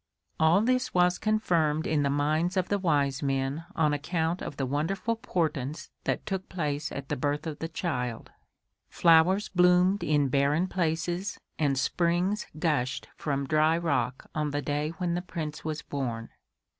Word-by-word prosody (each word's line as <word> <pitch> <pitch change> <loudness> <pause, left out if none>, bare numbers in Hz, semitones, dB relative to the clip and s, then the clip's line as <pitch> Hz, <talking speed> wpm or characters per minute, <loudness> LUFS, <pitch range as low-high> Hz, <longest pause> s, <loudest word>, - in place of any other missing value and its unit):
All 160 +5 +5
this 255 0 0
was 180 0 +3
confirmed 170 -8 +1
in 155 -2 +1
the 140 - +1
minds 155 +6 +1
of 185 - 0
the 205 - +1
wise 145 -7 +1
men 135 +3 -1
on 150 -2 +2
account 165 +3 -1
of 140 - -6
the 135 - -1
wonderful 165 - -1
portents 155 - -2
that - - -1
took 190 -2 -4
place 150 -4 -2
at 140 -1 -6
the - - 0
birth 145 +3 -1
of 155 -2 -5
the 165 - -3
child: 125 - -3 0.6
flowers 170 +5 +4
bloomed 180 +2 +4
in 145 -2 +2
barren 140 +6 +2
places 175 +1 -2 0.2
and 140 -3 +2
springs 175 +8 +1
gushed 140 -5 -1
from 140 -2 -2
dry 155 +3 +3
rock 130 -7 -1
on 150 -2 -1
the 145 0 -2
day 145 +1 -1
when 175 -2 -1
the 175 - -1
Prince 155 -4 -5
was 155 -1 -4
born. 120 -5 -4
155 Hz, 160 wpm, -28 LUFS, 145-180 Hz, 0.6 s, All